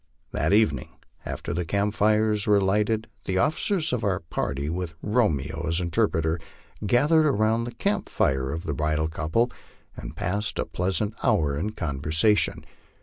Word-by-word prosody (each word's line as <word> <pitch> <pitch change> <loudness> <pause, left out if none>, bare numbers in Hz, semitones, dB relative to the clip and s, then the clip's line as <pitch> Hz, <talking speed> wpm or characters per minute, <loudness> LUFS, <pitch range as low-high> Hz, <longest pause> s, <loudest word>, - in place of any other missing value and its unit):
That 80 +4 0
evening, 100 - +2 0.3
after - - -4
the 90 - -1
camp 100 +5 0
fires 105 0 +2
were 105 -1 +5
lighted, 105 +3 +1 0.2
the 95 - -1
officers 160 - +1
of 125 - -1
our 100 -2 0
party, 70 -3 -3
with 85 0 -3
Romeo 80 - 0
as 85 +2 +1
interpreter, 85 -3 0 0.4
gathered 145 +9 +4
about 115 -3 +2
the 120 - -5
camp 200 +1 -1
fire 65 0 +1
of 80 +3 -4
the 80 - -2
bridal 75 +2 0
couple 80 +10 0 0.4
and - - -8
passed 100 +3 -2
a - - 0
pleasant 95 +4 -1
hour 80 - +2
in 100 +9 -2
conversation. 80 +7 +1
95 Hz, 150 wpm, -25 LUFS, 80-110 Hz, 0.4 s, were